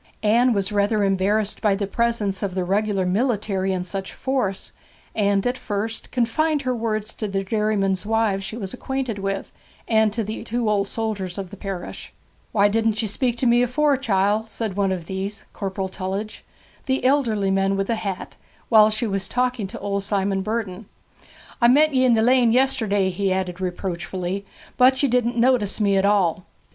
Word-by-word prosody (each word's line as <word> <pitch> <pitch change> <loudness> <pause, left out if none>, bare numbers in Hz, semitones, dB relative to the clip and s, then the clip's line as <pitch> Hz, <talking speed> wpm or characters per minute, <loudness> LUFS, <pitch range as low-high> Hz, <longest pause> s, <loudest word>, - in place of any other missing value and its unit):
Anne 235 +4 +4
was 200 -2 0
rather 205 +1 +2
embarrassed 200 +2 +1
by 205 -2 +3
the 200 0 -2
presence 210 -2 -1
of 195 -3 -3
the 185 - 0
regular 195 +1 0
military 200 -2 0
in 185 -1 -1
such 190 +1 -5
force, 255 -8 -2 0.4
and 200 -2 +1
at 245 +1 -1
first 220 +2 -4
confined 285 +5 +1
her 255 -1 0
words 215 -2 -2
to 215 - -4
the 195 -1 -2
dairymen's 200 -2 0
wives 215 -2 +1
she 215 +4 -6
was 195 -5 -5
acquainted 255 -4 -3
with, 195 0 -3 0.4
and 220 -2 +3
to 225 +2 -1
the 215 +2 -5
two 235 0 -2
old 205 -1 +1
soldiers 205 -5 -3
of 195 -2 -5
the - - -8
parish. 195 -2 -6 0.4
'Why 205 -1 +4
didn't 220 +1 +1
ye - - -1
speak 240 +4 -1
to 255 - -1
me 240 0 +5
afore, 285 +4 +2
chiel?' 215 -3 +1
said 220 -3 -4
one 195 -1 +1
of 180 -3 -3
these, 195 +3 -4
Corporal 195 -1 -3
Tullidge, 190 +3 -5 0.4
the 260 -1 0
elderly 230 -8 +2
man 195 0 +1
with 195 - 0
the 230 - 0
hat, 195 -4 -5 0.3
while 215 -2 +7
she 215 +2 -2
was 195 -3 -2
talking 250 -4 -1
to 230 +5 -8
old 200 0 -2
Simon 195 -1 0
Burden. 210 -1 -3 0.7
'I 235 - +6
met 295 +4 +5
ye 260 -1 +3
in 245 -2 +5
the 220 - +2
lane 245 -1 +4
yesterday,' 225 -7 +2
he 195 +1 -1
added 185 -1 -2
reproachfully, 185 +1 -3 0.3
'but 260 +2 +5
ye - - +5
didn't 240 -1 +1
notice 235 -4 +2
me 200 -2 +3
at 195 +1 +3
all.' 185 -4 +2
210 Hz, 185 wpm, -23 LUFS, 195-235 Hz, 0.7 s, while